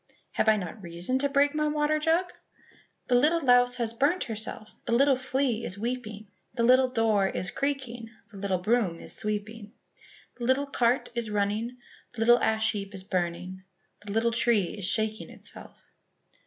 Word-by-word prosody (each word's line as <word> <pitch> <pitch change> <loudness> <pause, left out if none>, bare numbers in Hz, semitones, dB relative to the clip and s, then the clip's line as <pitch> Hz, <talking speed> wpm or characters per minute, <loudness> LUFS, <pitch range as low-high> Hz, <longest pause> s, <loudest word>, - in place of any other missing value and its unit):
"Have 220 - +2
I 215 - +5
not 200 +2 -6
reason 175 +8 -2
to 280 +1 +1
break 285 +1 +3
my 305 0 0
water 300 0 +1
jug?" 335 +3 +1 0.7
"The 250 - -1
little 300 +7 +4
louse 245 -3 +4
has 235 -2 -2
burnt 290 +10 +1
herself, 220 0 -5 0.2
The 235 - -1
little 275 +3 +5
flea 260 -2 -1
is 185 - -4
weeping, 220 -2 -4 0.3
The 235 - 0
little 255 +2 +5
door 225 -5 +2
is 190 +1 -3
creaking, 250 -4 -3 0.2
The 200 - -11
little 195 -1 -1
broom 190 -2 0
is - - -8
sweeping, 210 +1 -5 0.7
The 240 - -3
little 260 +3 +2
cart 250 -2 +1
is 235 -2 -2
running, 210 +4 -1 0.4
The 230 - -6
little 240 +2 +6
ash 220 0 +2
heap 200 -2 -6
is 190 - -4
burning, 185 0 -3 0.4
The 205 - -6
little 225 +2 +1
tree 230 -5 +1
is 205 -4 -5
shaking 215 +2 -1
itself." - - -12
230 Hz, 170 wpm, -27 LUFS, 205-255 Hz, 0.7 s, little